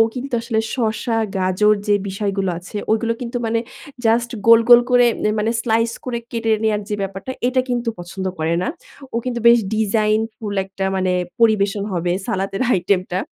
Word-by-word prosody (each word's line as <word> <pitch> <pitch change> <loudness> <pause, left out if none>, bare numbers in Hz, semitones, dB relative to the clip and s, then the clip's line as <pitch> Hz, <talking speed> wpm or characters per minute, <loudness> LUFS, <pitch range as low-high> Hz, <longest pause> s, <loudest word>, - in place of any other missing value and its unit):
কিন্তু 260 +1 -6
আসলে 230 -1 -1
শসা, 225 -1 -1 0.2
গাজর 190 +3 +3
যে 205 - +5
বিষয়গুলো 195 -1 -2
আছে 180 +4 -10 0.2
ওগুলো 230 +1 +1
কিন্তু 245 0 -4
মানে 225 0 0 0.4
just 235 +1 +2 0.2
গোল, 230 0 +8
গোল 240 -1 +9
করে 245 0 +5 0.2
এ - - +2
মানে 215 +2 +1
slice 230 0 +1
করে 245 -2 -2
কেটে 230 -1 -2
নেয়ার 215 -1 +1
যে 210 - -1
ব্যাপারটা 195 +5 -5 0.2
এটা 255 0 +2
কিন্তু 240 -1 -1
পছন্দ 175 +2 -6
করে 160 +1 0
না। - - -1 0.5
ও - - 0
কিন্তু 245 -2 -2
বেশ 235 0 +7 0.2
designful 215 0 0
একটা 195 0 -5
মানে 185 -1 +1 0.3
পরিবেশন 205 -3 +3
হবে 175 0 0
সালাতের 195 +3 -2
আইটেমটা। 185 0 0
215 Hz, 165 wpm, -20 LUFS, 195-235 Hz, 0.5 s, গোল